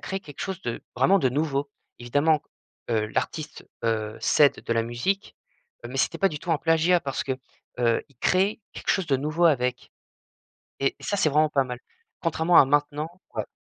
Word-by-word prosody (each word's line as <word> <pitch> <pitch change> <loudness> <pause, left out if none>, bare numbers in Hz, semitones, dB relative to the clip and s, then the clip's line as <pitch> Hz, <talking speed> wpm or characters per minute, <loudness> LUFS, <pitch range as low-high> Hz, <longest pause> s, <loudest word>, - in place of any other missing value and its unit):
crée 190 - -3
quelque 145 -7 -12
chose 190 -2 -4
de 120 - -4
vraiment 185 +11 +4
de 130 - +3
nouveau. 140 0 -1 0.3
Évidemment 145 +5 +2
qu - - -39 0.5
heu, 110 -1 +1
l'artiste, 150 +7 -4 0.2
heu, 110 -1 -1
s'aide 145 -2 +4
de - - 0
la 115 0 +2
musique, 120 - -2 0.5
heu, - - -5
mais - - -6
c'était - - +1
pas 195 - +4
du 150 - -6
tout 175 - -5
un 160 - +3
plagiat 165 +3 +3
parce 135 -3 -3
que, 135 - -2 0.5
heu, 115 -1 +2
il 140 - -26
crée 190 - +1
quelque - - -3
chose 190 -4 +1
de 135 - +2
nouveau 155 +5 0
avec. 125 -5 +1 0.9
Et 135 - +1
ça, 205 - -2
c'est 160 - +3
vraiment 155 +1 +3
pas 140 -2 +2
mal, 125 -1 -6 0.4
contrairement 165 +1 +3
à - - +9
maintenant 145 +2 0 0.3
ouais. - - -2
145 Hz, 195 wpm, -25 LUFS, 125-165 Hz, 0.9 s, à